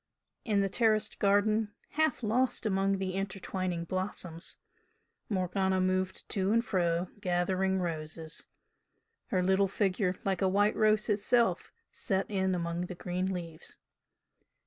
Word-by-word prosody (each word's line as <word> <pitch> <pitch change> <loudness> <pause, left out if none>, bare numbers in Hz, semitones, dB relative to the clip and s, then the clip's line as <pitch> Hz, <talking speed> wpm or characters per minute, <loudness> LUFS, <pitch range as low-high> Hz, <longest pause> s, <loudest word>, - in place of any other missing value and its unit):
In 205 -3 +2
the 195 - +2
terraced 215 +1 +1
garden, 210 +1 +2
half 315 -4 +1
lost 240 +3 +1
among 195 -1 +2
the 190 -1 -2
intertwining 190 -2 -3
blossoms, 180 -2 -3 0.7
Morgana 190 -1 +1
moved 185 0 0
to 195 0 0
and 230 +2 +3
fro, 175 -2 0
gathering 190 0 +1
roses, 160 -2 -4 0.8
her 185 -5 +1
little 190 +2 +3
figure 190 -1 0
like 195 -1 0
a 190 - +3
white 205 +2 +3
rose 215 0 +3
itself 225 +3 +2 0.2
set 195 -4 -1
in 190 -2 +1
among 170 0 -2
the 180 - -6
green 180 +2 -2
leaves. 170 -3 -6
190 Hz, 125 wpm, -31 LUFS, 180-205 Hz, 0.8 s, and